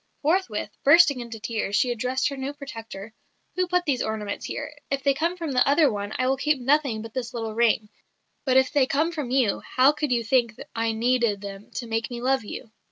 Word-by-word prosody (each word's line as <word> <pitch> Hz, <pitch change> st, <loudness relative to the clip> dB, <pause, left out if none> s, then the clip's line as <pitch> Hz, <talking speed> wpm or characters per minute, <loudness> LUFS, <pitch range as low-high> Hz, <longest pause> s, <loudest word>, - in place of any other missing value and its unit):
Forthwith, 300 Hz, -, 0 dB
bursting 290 Hz, -2 st, +6 dB
into 235 Hz, -2 st, -7 dB
tears, 215 Hz, -2 st, -2 dB
she 245 Hz, +3 st, +2 dB
addressed 255 Hz, +4 st, 0 dB
her 280 Hz, -, -5 dB
new 270 Hz, +1 st, -4 dB
protector: 225 Hz, -7 st, -9 dB, 0.4 s
'Who 365 Hz, 0 st, +1 dB
put 360 Hz, 0 st, +1 dB
these 265 Hz, -4 st, 0 dB
ornaments 215 Hz, -2 st, -3 dB
here? -, -, -5 dB, 0.2 s
If 275 Hz, -1 st, -2 dB
they 275 Hz, -, +4 dB
come 335 Hz, +6 st, -1 dB
from 330 Hz, -4 st, -4 dB
the 250 Hz, -1 st, +3 dB
other 290 Hz, -1 st, +4 dB
one, 205 Hz, -1 st, -4 dB
I 255 Hz, -, 0 dB
will 265 Hz, +1 st, +1 dB
keep 295 Hz, +1 st, +1 dB
nothing 265 Hz, -4 st, +1 dB
but 225 Hz, -1 st, -9 dB
this 245 Hz, -2 st, -4 dB
little 225 Hz, -2 st, -3 dB
ring; 220 Hz, -1 st, +2 dB, 0.6 s
but 260 Hz, -2 st, +3 dB
if 265 Hz, 0 st, +3 dB
they 280 Hz, -3 st, +3 dB
come 310 Hz, +5 st, +1 dB
from 300 Hz, -7 st, -4 dB
you, 255 Hz, -5 st, +2 dB
how 260 Hz, +2 st, +3 dB
could 300 Hz, -2 st, -3 dB
you 240 Hz, -1 st, +2 dB
think 235 Hz, -1 st, +1 dB, 0.2 s
I 230 Hz, 0 st, 0 dB
needed 235 Hz, -2 st, +1 dB
them 200 Hz, 0 st, -8 dB
to 245 Hz, -, -3 dB
make 225 Hz, -1 st, -2 dB
me 240 Hz, -1 st, -5 dB
love 260 Hz, 0 st, +1 dB
you?'" 215 Hz, +1 st, -8 dB
255 Hz, 220 wpm, -25 LUFS, 225-280 Hz, 0.6 s, bursting